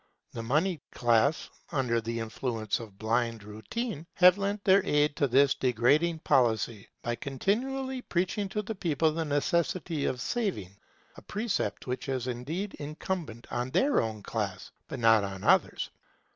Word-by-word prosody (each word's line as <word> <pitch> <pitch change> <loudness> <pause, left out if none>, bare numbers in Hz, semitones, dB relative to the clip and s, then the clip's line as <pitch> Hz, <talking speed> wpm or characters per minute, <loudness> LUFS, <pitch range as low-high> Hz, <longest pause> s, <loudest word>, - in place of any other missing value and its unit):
The 115 - -5
monied 155 +7 +1
classes, 120 +5 +2 0.2
under 125 -6 +1
the 115 +1 -3
influence 115 -1 -2
of 105 -4 -10
blind 115 0 0
routine, 155 - -5
have 180 0 +7
lent 200 +1 -2
their 195 0 +5
aid 150 -5 +2
to 140 - +3
this 135 +2 +5
degrading 145 +7 +2
policy, 115 -5 +2
by 120 - -1
continually 255 - -2
preaching 190 +1 -1
to 210 +2 -2
the 220 - -4
people 160 -5 +1
the 165 +1 -2
necessity 155 +2 0
of 125 - -1
saving; 125 - -2 0.4
a - - -10
precept 205 - -2
which 125 +1 -4
is 130 -2 -1
indeed 145 +11 -3
incumbent 150 - -4
on 120 +1 -2
their 280 - +3
own 110 -2 -4
class, 100 -5 -4 0.2
but - - -5
not 115 -2 +5
on 95 -1 -5
others. - - +2
140 Hz, 150 wpm, -29 LUFS, 115-180 Hz, 0.4 s, have